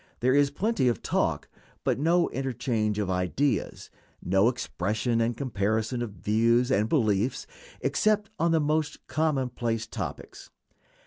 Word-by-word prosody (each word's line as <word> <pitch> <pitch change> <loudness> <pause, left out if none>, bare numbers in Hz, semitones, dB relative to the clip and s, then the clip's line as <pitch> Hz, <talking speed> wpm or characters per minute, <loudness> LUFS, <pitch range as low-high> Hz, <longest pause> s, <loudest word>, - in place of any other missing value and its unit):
There 130 +2 +3
is 145 0 +4
plenty 200 - 0
of 120 - 0
talk, - - 0 0.4
but - - 0
no 170 +4 +3
interchange 120 -5 -1
of 100 -3 -1
ideas; 90 +10 -1 0.3
no 95 +4 +3
expression 115 0 -1
and 115 0 0
comparison 110 -1 -1
of 115 -4 -4
views 115 +7 +2
and 105 -1 +2
beliefs, 110 -4 +1 0.4
except 215 -1 +1
on 170 - +2
the 165 -1 +3
most 150 0 -1
commonplace 130 -6 -1
topics. - - -7
120 Hz, 130 wpm, -27 LUFS, 110-145 Hz, 0.4 s, is